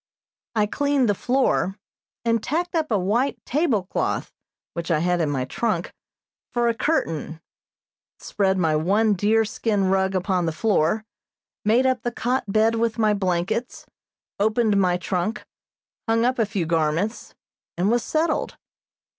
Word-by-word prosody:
I 210 -1 +3
cleaned 285 +3 +1
the 205 - +3
floor, 245 -4 +1 0.5
and 230 -1 +2
tacked 345 +10 -2
up 320 -2 0
a 215 - +2
white 220 +9 0
tablecloth 245 - -1 0.4
which 170 0 -5
I 165 - +3
had 175 +2 +1
in 155 - +1
my 135 -3 -1
trunk, 185 - -2 0.6
for 240 -1 +1
a 235 - +2
curtain; 165 - -1 0.8
spread 190 -2 0
my 160 -4 +2
one 205 +7 +2
deer 215 +4 +2
skin 205 -3 0
rug 190 0 +1
upon 185 -2 0
the - - +1
floor, 210 +2 +1 0.6
made 230 +5 +3
up 260 -1 +1
the 240 - -2
cot 250 +3 -1
bed 220 +2 +3
with 230 0 0
my 215 -2 +3
blankets, 195 +5 -2 0.5
opened 220 +1 +2
my 180 -2 +3
trunk, 185 +3 -2 0.6
hung 230 +1 +3
up 255 0 +1
a 225 - +2
few 200 -5 -2
garments, 165 +6 -1 0.4
and 185 +5 +2
was 240 0 +2
settled. 315 +3 -1
210 Hz, 145 wpm, -23 LUFS, 180-235 Hz, 0.8 s, I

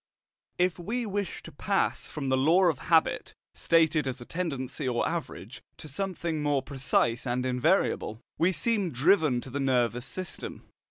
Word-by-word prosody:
If 180 0 +1
we 230 +7 -2
wish 200 -3 -3
to - - -10
pass - - 0
from 140 -3 -4
the 130 - +3
law 160 +8 +4
of 165 -7 +3
habit, 165 -2 +2 0.2
stated 160 -3 +2
as 130 0 -3
a 120 - -9
tendency 140 -7 -3
or 120 -2 +1
average, - - -5 0.2
to - - -10
something 170 0 -3
more 145 -2 +1
precise 130 -3 0
and 125 +1 -1
invariable, 130 - +1 0.2
we 170 +3 +4
seem 200 +3 0
driven 150 -2 +3
to 130 - -9
the 140 - -3
nervous 125 -2 +1
system. 185 +4 -6
150 Hz, 160 wpm, -28 LUFS, 130-180 Hz, 0.2 s, law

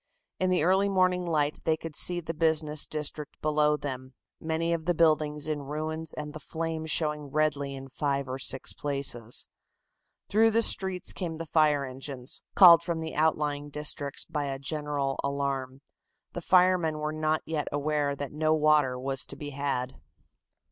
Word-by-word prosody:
In 185 - +1
the 180 -4 +2
early 190 +3 +3
morning 185 -2 +1
light 150 -2 0
they 160 -1 +1
could 160 -1 -8
see 175 -1 +2
the 165 -1 -5
business 155 -2 +1
district 150 -1 -2
below 150 0 +2
them, 130 -2 -6 0.2
many 165 +1 -1
of 160 -1 -3
the 175 0 +1
buildings 155 -2 +2
in 150 -2 -2
ruins 155 +3 -4
and 150 -1 -6
the 155 - -7
flames 160 0 -4
showing 150 -1 0
redly 145 -1 -1
in 135 0 -8
five 140 0 -2
or 130 +1 -5
six 130 0 -1
places. 135 -5 -2 0.8
Through 225 +2 +4
the 230 +1 +3
streets 190 -4 +3
came 165 -3 -4
the 165 - -5
fire 150 -3 +2
engines, 130 0 -5
called 175 -4 +9
from 170 -1 -3
the 160 0 -5
outlying 150 -2 0
districts 145 -1 -2
by 150 -2 -3
a 135 -1 -3
general 145 -1 -2
alarm. 140 -1 -3 0.5
The 175 - -5
firemen 180 -3 +3
were 150 0 -3
not 155 0 0 0.3
aware 145 0 0
as - - -1
yet - - -9
that 140 -2 -5
no 155 +1 +2
water 150 -4 +3
was 135 +1 +1
to - - -9
be 145 -1 -7
had. 135 -2 -3
150 Hz, 170 wpm, -28 LUFS, 140-160 Hz, 0.8 s, called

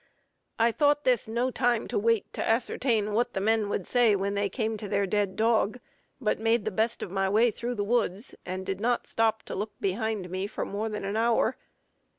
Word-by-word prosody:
I 230 +1 +4
thought 290 +3 +2
this 250 -4 +2
no 240 +3 0
time 240 -2 +1
to - - 0
wait 230 0 +1
to - - -2
ascertain 225 -2 +1
what 235 +3 +1
the - - +1
men 215 +1 +1
would 195 - -2
say 240 -4 +4
when 200 +1 -1
they 200 0 0
came 220 +1 -2
to 210 - -6
their 200 0 +1
dead 200 0 0
dog, 225 +1 +2 0.4
but 220 -5 0
made 225 -1 +2
the 215 - -1
best 220 +4 0
of - - -6
my 195 0 0
way 225 +4 +4
through 240 +3 -4
the 205 - -1
woods, 220 -1 0
and 185 +1 -5
did 195 +1 -3
not 240 +1 +1
stop 220 -1 +1
to - - -7
look 210 +2 -3
behind 200 -1 -2
me 190 +1 -2
for 205 - -4
more 215 +2 -3
than 210 -2 -4
an 200 +2 -2
hour. 230 +2 +2
220 Hz, 215 wpm, -28 LUFS, 200-235 Hz, 0.4 s, I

